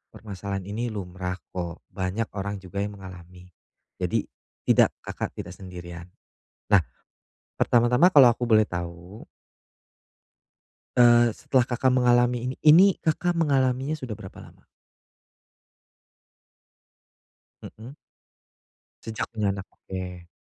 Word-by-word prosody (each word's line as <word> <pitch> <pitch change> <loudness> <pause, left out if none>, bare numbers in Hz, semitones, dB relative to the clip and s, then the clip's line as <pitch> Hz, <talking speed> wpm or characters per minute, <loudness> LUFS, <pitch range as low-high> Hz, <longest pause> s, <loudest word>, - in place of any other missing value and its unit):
Permasalahan 100 -2 -6
ini 110 +5 -4
lumrah, 90 -3 -5 0.2
kok. 85 -2 -6
Banyak 95 +4 -3
orang 100 0 -4
juga 100 +2 -6
yang 100 0 -3
mengalami. 90 -1 -13 0.5
Jadi - - 0 0.4
tidak - - +3
Kakak - - -5
tidak 90 - -7
sendirian. 90 -2 -10 0.6
Nah. 100 - +7 0.8
Pertama-tama 125 +10 +4
kalau 135 -4 +8
aku 120 +1 0
boleh 110 -2 +3
tahu 85 +3 -7 1.7
Eee, 120 -1 +6
setelah 130 -3 +1
Kakak 125 +1 +1
mengalami 125 0 +2
ini 130 - -5
ini 170 +6 +8
Kakak 170 +2 -1
mengalaminya 135 -2 +1
sudah 130 -8 -6
berapa 95 - -11
lama? - - -17 3.0
Mhm. 120 +6 -11 1.1
Sejak 110 -1 -4
punya 105 -3 -1
anak? 95 - -6
Oke. 90 -2 -8
105 Hz, 105 wpm, -25 LUFS, 95-125 Hz, 3.0 s, kalau